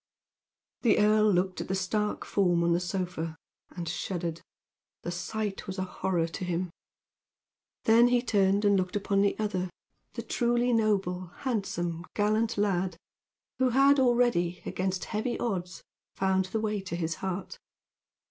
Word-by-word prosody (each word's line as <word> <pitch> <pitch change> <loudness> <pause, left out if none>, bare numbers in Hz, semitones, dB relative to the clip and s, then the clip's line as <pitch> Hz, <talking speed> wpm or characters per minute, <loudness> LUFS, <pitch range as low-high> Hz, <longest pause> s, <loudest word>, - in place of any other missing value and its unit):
The 230 - +4
earl 215 0 +4
looked 185 0 0
at - - -5
the 190 - -1
stark 210 +3 -1
form 175 -4 +2
on 170 0 +3
the 170 - +2
sofa 175 -3 -3 0.3
and 175 -2 -6
shuddered. 170 -1 -3 0.6
The 175 - -3
sight 200 +3 -4
was 190 0 -5
a 185 - 0
horror 180 -2 -1
to 170 +3 -6
him. 180 0 -2 1.1
Then 230 +2 +6
he 245 0 +2
turned 200 -3 +2
and 200 0 +5
looked 185 0 0
upon 200 -1 +1
the 200 0 +2
other 190 -4 -1 0.4
the - - -5
truly 240 0 +1
noble, 195 -5 +1
handsome, 175 -9 -2
gallant 215 +2 +1
lad, 190 -4 0 0.6
who 260 -1 +4
had 275 +3 +5
already, 240 -9 +2
against 185 0 -2
heavy 220 +3 -2
odds, 180 -6 -3 0.3
found 190 0 +2
the 220 +4 -2
way 210 -2 -1
to 180 -3 -5
his 165 -1 -1
heart. 190 0 -4
190 Hz, 150 wpm, -29 LUFS, 180-215 Hz, 1.1 s, Then